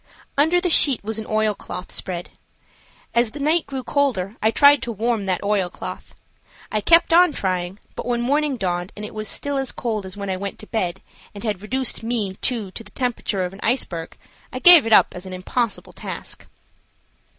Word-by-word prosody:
Under 320 +5 +3
the 360 - -1
sheet 275 -8 +6
was 220 +1 -3
an 220 - -7
oilcloth 215 -4 -2
spread. 175 -2 -5 0.8
As 235 -1 +3
the 290 - -9
night 310 +4 +1
grew 270 -2 -5
colder 230 -10 0
I 220 - +4
tried 285 +5 +6
to 240 - -3
warm 225 -1 -1
that 185 0 -1
oilcloth. 200 -3 -3 0.6
I 215 - 0
kept 335 - +5
on 350 -2 +6
trying, 185 0 -2 0.2
but - - -6
when 240 -1 0
morning 285 +2 +1
dawned 180 -2 -2
and 210 - -6
it - - -9
was 215 0 -4
still 285 +6 -2
as 270 -2 -2
cold 215 -5 -3
as 185 - -7
when 200 -1 -4
I 185 - -2
went 200 +1 -5
to - - -11
bed, 190 -5 -3 0.3
and 200 - -8
had 210 -5 -2
reduced 255 +4 -1
me 225 -4 -2
too, 225 -7 -2
to 230 - -7
the 205 - -15
temperature 225 -6 -2
of 180 - -6
an 195 - -12
iceberg, 180 -9 -2 0.3
I - - -5
gave 325 -2 +8
it - - -2
up - - +6
as 180 +1 -8
an 185 - -7
impossible 215 +5 -3
task. - - -7
220 Hz, 195 wpm, -22 LUFS, 195-260 Hz, 0.8 s, gave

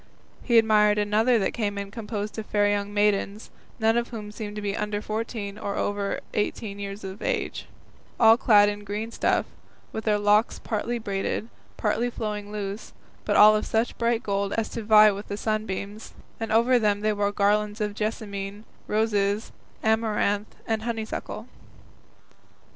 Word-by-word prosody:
He 240 - 0
also - - +10
admired 210 -1 +4
another 215 +4 +3
that 195 - 0
came 205 -3 -2
in 200 0 -5
composed 210 -1 -5
of 215 - -6
fair 205 -1 +2
young 205 0 0
maidens, 205 0 0 0.3
none 225 +1 +3
of 235 0 0
whom 210 -3 -7
seemed 210 -1 -6
to - - -4
be 200 -1 -1
under 210 0 -2
fourteen 215 -1 -4
or 200 -2 -3
over 205 -1 -1
eighteen 210 -1 -2
years 200 +1 -6
of 190 +2 -7
age, - - -2 0.5
all 225 -1 +8
clad 210 -4 +5
in 205 0 -3
green 210 +3 -4
stuff, - - +1 0.5
with 220 - -5
their 210 -1 +3
locks 210 +2 +3
partly 230 +2 -2
braided, 205 +1 -3 0.3
partly 225 +3 0
flowing 210 -3 -4
loose, 205 0 -5 0.3
but - - +1
all 215 +1 +8
of 215 - 0
such 225 +2 0
bright 235 0 +1
gold 200 0 -1
as 225 -1 -1
to 230 - -5
vie 215 0 +7
with 200 +1 -7
the 205 - -4
sunbeams, 215 -1 -3 0.2
and 225 - -3
over 240 +3 +4
them 205 -2 +1
they 215 0 +1
wore 205 0 0
garlands 210 +1 +1
of 210 -1 -1
jessamine, 205 -1 -4 0.2
roses, 210 -1 0 0.3
amaranth, 215 -2 +1
and 220 -1 -1
honeysuckle. 225 -1 -4
210 Hz, 165 wpm, -26 LUFS, 205-220 Hz, 0.5 s, also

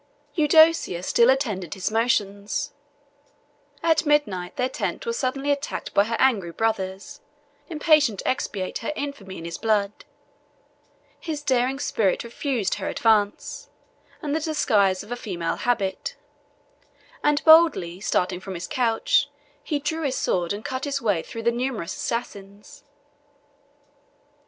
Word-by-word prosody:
Eudocia 315 - +4
still 235 +5 +4
attended 210 - 0
his 190 +2 -2
motions: 205 -3 0 1.1
at 325 -1 +3
midnight, 290 - 0
their 250 -1 0
tent - - -4
was 465 0 -2
suddenly 275 - -1
attacked 285 0 -3
by 200 - +4
her 230 +1 -2
angry 220 -10 +2
brothers, 205 +5 -3 0.5
impatient 300 - +3
to - - -5
expiate 205 -8 -2
her 235 - -3
infamy 280 -11 -6
in 165 - -8
his 170 0 -6
blood: 210 -2 +1 1.3
his 305 -3 -5
daring 260 -1 +1
spirit 215 -8 0
refused 235 -3 -2
her - - -3
advice, 210 -3 0 0.5
and 295 0 -1
the - - +1
disguise 210 - +1
of 210 - -14
a - - -1
female 180 -8 -3
habit; 200 -6 -1 1.1
and, 295 0 +2
boldly 315 - +6
starting 180 -3 0
from 190 0 -7
his 175 +1 -5
couch, 230 -3 +1 0.3
he 300 - -1
drew 315 +3 -3
his 275 -4 -1
sword, 175 -2 0
and 205 +2 -5
cut 260 -1 -3
his 280 -1 -1
way 205 -9 +1
through 225 +6 -8
the 235 - +3
numerous 240 -7 -3
assassins. 200 -3 -6
230 Hz, 135 wpm, -24 LUFS, 195-285 Hz, 1.3 s, boldly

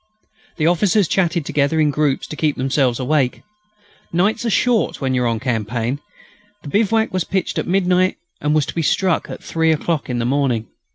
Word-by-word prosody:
The 155 - 0
officers 180 +3 +3
chatted 170 -4 0
together 145 +3 +1
in 150 -1 +3
groups 145 -1 0
to - - -7
keep 150 -2 0
themselves 130 -2 +1
awake. 130 -1 0 0.7
Nights 190 +8 +1
are 235 - 0
short 235 +1 +1
when 130 -2 -1
you 125 - +1
are - - +1
on 115 -1 -1
campaign. 120 +1 -2 0.6
The 145 - -7
bivouac 220 +4 +1
was 185 -2 +1
pitched 190 0 -2
at - - -3
midnight 185 0 +2 0.2
and 150 +1 +1
was 150 -3 +2
to - - -6
be 170 - -1
struck 175 +3 +1
at - - -8
three 160 0 +1
o'clock 160 -1 -1
in 125 - -1
the 120 - -1
morning. 130 -4 0
155 Hz, 190 wpm, -19 LUFS, 130-180 Hz, 0.7 s, officers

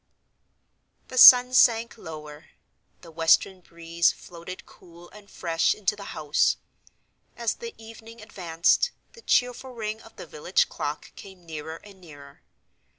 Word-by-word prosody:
The 255 - -8
sun 250 0 +9
sank 235 -2 +3
lower; 155 -5 -11 0.5
the 170 - -14
western 165 +3 +2
breeze 170 0 -1
floated 175 +2 -11
cool 175 0 -18
and 205 -1 -16
fresh 165 -2 -1
into 210 0 -1
the 200 -1 -11
house. 150 -1 +1 0.8
As 235 -2 -1
the 465 -1 -10
evening 225 +1 -14
advanced, 180 - 0 0.2
the 465 - -16
cheerful 250 - -1
ring 220 -1 -5
of - - -17
the - - -10
village 480 +1 -1
clock - - -6
came 190 -3 -14
nearer 160 0 -7
and 200 -2 -16
nearer. 145 -4 -15
190 Hz, 135 wpm, -25 LUFS, 165-230 Hz, 0.8 s, sun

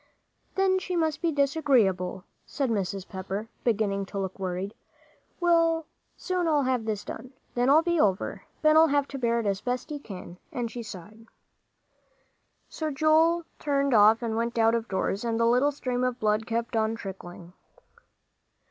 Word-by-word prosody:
"Then 380 -1 +3
she 365 -1 -4
must 320 -3 0
be 335 -2 +1
disagreeable," 260 - +1 0.2
said 270 -4 -2
Mrs. 195 -2 -2
Pepper, 195 +3 -5
beginning 200 -4 0
to 200 - -7
look 190 0 -4
worried. 190 +2 -3 0.7
"Well, 335 -2 +4
I'll 325 -1 -6 0.3
soon 330 -6 0
have 255 -3 0
this 210 -2 -3
done, 255 +4 -8 0.2
then 245 +2 +1
I'll 310 +3 +6
be 345 -1 +1
over. 195 -7 0 0.2
Ben'll 310 +1 +6
have 285 -1 +1
to 275 - -6
bear 235 -1 +1
it - - -7
as 195 -1 0
best 250 +4 -3
he 295 - -4
can," 180 -7 -10
and 235 -2 -3
she 240 - -6
sighed. 215 +1 -11 1.4
So 315 -1 -4
Joel 320 +3 +3
turned 280 -2 +1
off 220 +1 +6
and 225 -1 -1
went 235 +1 -2
out 225 0 +4
of 230 -1 -1
doors, 195 +2 -1
and 230 -1 -1
the 230 - +3
little 250 +5 +3
stream 255 -3 -2
of 250 -1 -1
blood 215 +1 +1
kept 230 +1 -2
on 220 0 +1
trickling. 180 -4 -9
235 Hz, 165 wpm, -27 LUFS, 205-290 Hz, 1.4 s, I'll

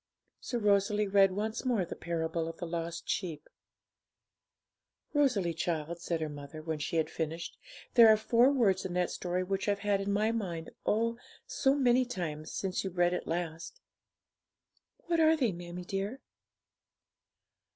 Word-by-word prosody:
So 245 - -3
Rosalie 205 -1 +2
read 195 -1 +5
once 215 +3 -2
more 235 -8 +1
the - - -7
parable 165 -1 -2
of 165 0 -7
the 175 - -5
Lost 170 0 -4
Sheep. 160 -5 -3 1.7
'Rosalie, 245 - +2
child,' 165 0 -3
said 170 -2 -2
her 155 - -1
mother, 145 +1 -8
when 160 -1 -3
she 150 - -3
had 160 -1 +2
finished, 165 +1 -4 0.4
'there 235 -2 +9
are 215 - +7
four 235 +4 +4
words 200 -9 +2
in 185 - -4
that 180 0 +1
story 180 0 -2
which 195 +2 -1
I've 200 - +2
had 200 -1 +2
in 200 +1 -1
my 210 +2 +2
mind, 175 -8 -4 0.2
oh, 230 +2 +1 0.3
so 270 0 +2
many 255 -2 +4
times, 165 -10 -5
since 190 -2 -2
you 190 - -2
read 175 -1 +2
it - - -3
last.' 165 - -4 1.3
'What 340 -1 +1
are 320 0 +5
they, 250 -8 +2
mammie 175 0 -7
dear?' 195 +7 -3
190 Hz, 160 wpm, -31 LUFS, 170-220 Hz, 1.7 s, there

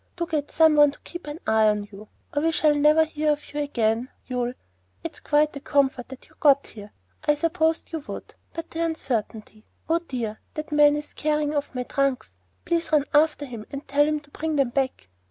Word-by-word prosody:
Do 345 - -2
get 300 -3 -2
some 320 -1 +4
one 295 0 +7
to 280 - -10
keep 345 -3 -9
an 295 +2 -6
eye 220 0 +4
on 210 -1 +1
you, 210 +2 -11 0.3
or 290 - +2
we 325 - +2
shall 310 -2 +3
never 300 +2 +5
hear 305 -1 +1
of 295 0 -9
you 295 - -2
again. 240 -4 0 0.2
You'll 245 -1 -2 0.3
' 90 +1 -41
It's - - -6
quite 300 0 +2
a - - -5
comfort 270 -3 +1
that 265 -1 -10
you - - -23
have 315 - -26
got 280 -2 +5
here. 205 -1 -11 0.4
I 295 - +5
supposed 325 +1 0
you 325 - -1
would, - - -7 0.2
but 330 0 -7
the 330 +1 -2
uncertainty 225 -9 -3 0.2
Oh, 330 +1 +2
dear! 240 -10 -5 0.2
that 305 0 -5
man 295 0 +5
is 295 0 -6
carrying 300 -1 0
off 290 -2 -2
my 250 - -1
trunks. 265 - -1 0.3
Please 335 -1 0
run 300 -2 +4
after 295 -1 +3
him 230 -5 -8
and 275 0 -7
tell 280 +1 +4
him 305 0 0
to 285 0 -20
bring 315 +1 -2
them 275 -4 +2
back!" 260 - -2
290 Hz, 220 wpm, -25 LUFS, 250-305 Hz, 0.4 s, one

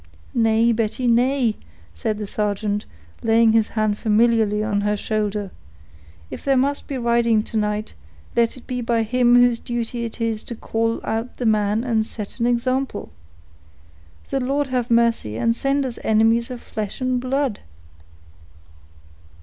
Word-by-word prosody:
"Nay, 225 0 +3
Betty, 230 +2 -1
nay," 245 -1 +2 0.4
said 220 -4 -2
the 210 - -4
sergeant, 205 0 -2 0.3
laying 225 0 +4
his 225 -1 +3
hand 215 -1 +1
familiarly 220 -1 +2
on 205 -2 0
her 210 0 0
shoulder; 210 -2 -2 0.8
"if - - -7
there 275 -1 +2
must 280 +2 0
be 275 - -3
riding 235 -2 +2
to 225 - -10
night, 210 0 -1 0.4
let 235 +1 +2
it 250 - -14
be 250 -1 -3
by 230 -1 +1
him 245 +2 +3
whose 245 -1 +5
duty 240 0 -3
it 230 - -7
is 225 -2 -1
to 235 - -6
call 225 +1 -1
out 225 +2 -3
the 245 - -3
men 215 0 +2
and 225 -3 +1
set 215 +1 -8
an 235 - +2
example. 255 +3 -1 1.2
The 275 - +1
Lord 275 +2 -1
have 250 -2 -1
mercy, 230 - +2
and 230 0 +1
send 275 +2 0
us 245 -3 -5
enemies 225 +2 +3
of 250 -2 -7
flesh 210 -2 -5
and 255 -1 0
blood!" 260 -2 -1
230 Hz, 155 wpm, -22 LUFS, 215-245 Hz, 1.2 s, whose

